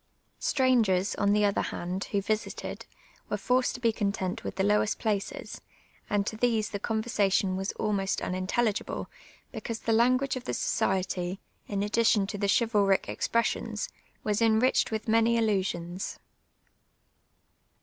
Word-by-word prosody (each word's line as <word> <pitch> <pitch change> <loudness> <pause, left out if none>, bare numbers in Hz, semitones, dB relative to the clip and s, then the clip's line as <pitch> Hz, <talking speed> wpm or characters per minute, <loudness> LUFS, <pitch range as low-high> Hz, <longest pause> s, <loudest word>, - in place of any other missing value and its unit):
Stranp; 255 -6 +3
ers, 185 +2 +1
on 200 0 +2
the 210 0 +4
other 200 0 +2
hand, 180 +2 -4
wha 200 - +1
visited, 215 +2 -3 0.4
were - - -1
forced 250 +1 +1
to - - -7
be 230 -2 +3
content 200 -4 -2
with - - -5
the 190 - 0
lowest 210 +2 +1
])laces. 200 -3 -2 0.5
and! 205 -1 +1
to 220 - -3
these 225 -2 +1
the 200 - -3
conversation 205 -4 +1
was 190 +1 -2
almost 200 -3 -1
unintelli}j:ible. 190 +4 -1 0.5
l)ecau.se 225 0 -5
the 230 - +2
lauf^uage 255 +4 +3
of 255 -1 -6
the - - -2
society, 185 0 -1 0.3
in 200 -1 -1
addition 215 -1 +3
to 205 0 -5
the 200 - +1
chivalric 205 -3 +3
expres 230 -1 +1
Bions, 215 -3 -5 0.3
was 210 0 0
enriched 225 +3 +3
with 220 0 -3
many 230 +1 +4
allusions. 190 -5 -1
210 Hz, 145 wpm, -28 LUFS, 195-230 Hz, 0.5 s, the